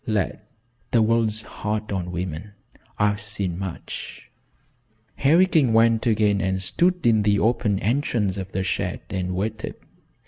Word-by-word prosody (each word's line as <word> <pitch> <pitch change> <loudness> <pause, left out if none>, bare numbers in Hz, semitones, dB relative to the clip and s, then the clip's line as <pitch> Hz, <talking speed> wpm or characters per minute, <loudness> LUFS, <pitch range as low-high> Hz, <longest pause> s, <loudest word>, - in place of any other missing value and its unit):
Lad, 105 -5 0 0.5
the 115 -2 +3
world's 110 -1 +1
hard 105 0 -4
on 90 -3 -2
women. 90 +2 -5 0.4
I've 105 0 +1
seen 100 -4 -4
much." 95 -3 -7 0.9
Harry 165 +7 +5
King 155 -10 +2
went 115 0 +4
again 105 -3 +2
and 95 0 0
stood 175 - +1
in 110 -2 +4
the 100 0 +3
open 105 -1 +1
entrance 110 -3 0
of 95 0 -6
the 95 - -1
shed - - -2
and 90 -1 -2
waited. 105 +3 -3
105 Hz, 140 wpm, -23 LUFS, 95-115 Hz, 0.9 s, Harry